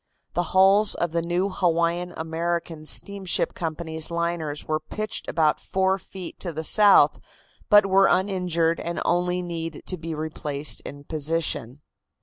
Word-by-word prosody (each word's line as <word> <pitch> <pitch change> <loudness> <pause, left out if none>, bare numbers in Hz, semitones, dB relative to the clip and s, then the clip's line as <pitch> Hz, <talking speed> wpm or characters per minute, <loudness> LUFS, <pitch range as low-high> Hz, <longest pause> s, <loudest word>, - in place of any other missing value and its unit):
The 175 - +1 0.2
hulls 200 +2 +5
of 170 -1 -2
the 170 0 0
new 175 +3 -1
Hawaiian 175 -1 0
American 165 0 -3
Steamship 195 +3 +1
Company's 160 -1 -4
liners 170 -3 -3
were 155 0 0
pitched 215 +8 -5
about 155 -2 +1
four 190 0 0
feet 185 -2 -10
to 175 - -3
the 160 0 -5
south, 205 +5 +6 0.5
but 205 -1 +7
were 195 0 +4
uninjured 180 -4 +1
and 170 0 -4
only 180 +1 0
need 165 -2 -6
to 185 - -3
be 165 0 -5
replaced 150 -2 -1
in 145 0 -10
position. 150 -4 -2
170 Hz, 140 wpm, -24 LUFS, 160-185 Hz, 0.5 s, but